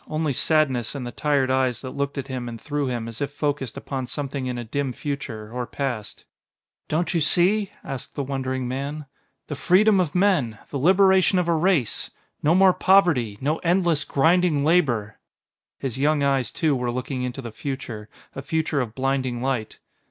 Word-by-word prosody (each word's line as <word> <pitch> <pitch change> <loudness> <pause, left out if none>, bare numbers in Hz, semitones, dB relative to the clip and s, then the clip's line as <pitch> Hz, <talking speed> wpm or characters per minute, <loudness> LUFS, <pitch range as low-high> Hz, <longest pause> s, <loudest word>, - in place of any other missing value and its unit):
Only 155 -2 -1
sadness 135 -5 +1
in 135 - -4
the 120 - -5
tired 140 -1 +1
eyes 130 -2 +1
that 130 - -6
looked 140 0 -3
at 135 - -3
him 125 -3 -4
and 115 -1 -8
through 145 +2 -2
him 120 -2 -3
as 115 +2 -8
if 140 0 -1
focused 145 -4 -2
upon 130 -2 -4
something 140 -1 -4
in 125 -1 -3
a 120 - -4
dim 135 +3 -2
future 130 -7 -5
or 125 -1 -3
past. 125 -8 -4 0.6
"Don't 170 +3 0
you 170 - +1
see?" 190 +6 +3
asked 135 - -6
the 140 - -2
wondering 130 -1 -3
man. 140 +4 -4 0.4
"The - - -5
freedom 195 +7 +4
of 175 -4 -1
men 180 - +2
the 140 - -2
liberation 190 +4 +4
of 180 -1 +1
a 170 - +3
race. 160 - +1 0.3
No 160 +3 +3
more 190 0 +6
poverty, 165 - +3
no 150 +4 0
endless, 170 -3 +2
grinding 160 0 +2
labor." 120 -11 +1 0.6
His 130 -1 -4
young 145 +1 +2
eyes, 135 -3 +1
too, 155 -4 +1
were 125 -1 -2
looking 125 +1 -3
into 125 +1 -4
the 115 - -6
future, 115 -4 -6 0.2
a 135 - -6
future 155 0 -1
of 115 -2 -5
blinding 130 -2 -1
light. 130 -5 -2
140 Hz, 180 wpm, -24 LUFS, 125-160 Hz, 0.6 s, more